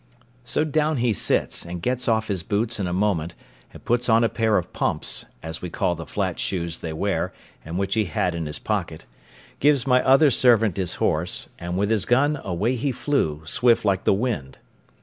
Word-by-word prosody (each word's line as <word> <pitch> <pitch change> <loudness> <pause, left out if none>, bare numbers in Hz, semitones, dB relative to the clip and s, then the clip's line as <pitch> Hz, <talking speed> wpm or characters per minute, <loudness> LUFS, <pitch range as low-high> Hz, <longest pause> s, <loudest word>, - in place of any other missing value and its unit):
So 125 +5 0
down 155 0 0
he 120 -2 +1
sits, - - 0
and 85 +1 -6
gets 125 +7 -1
off 110 -1 +1
his 95 -4 -1
boots 110 +5 -1
in 95 - -1
a - - -3
moment, 90 -3 0 0.4
and - - -14
puts 120 +1 +1
on 115 +1 +5
a 115 - +3
pair 110 -3 +1
of 90 - -4
pumps - - -1 0.2
(as 80 0 -4
we 90 - -5
call 85 - 0
the 80 -2 -8
flat - - -2
shoes 85 -3 -2
they 80 - -5
wear, 80 - -1 0.3
and 80 +2 -5
which 100 0 -1
he 110 0 +1
had 90 +1 -1
in 85 -2 -4
his 75 - -3
pocket), 90 -7 -3 0.5
gives 140 -3 +3
my 125 -1 +4
other 135 +2 +5
servant 115 -6 +4
his 95 -3 -2
horse, 80 +3 -1
and 85 +1 -4
with 100 +2 0
his 105 -4 +2
gun 140 +4 +2
away 100 +7 -1
he 135 +4 -1
flew, 120 - -1
swift 120 - +2
like 95 -2 +1
the - - +3
wind. 100 - -2
105 Hz, 205 wpm, -23 LUFS, 85-125 Hz, 0.5 s, on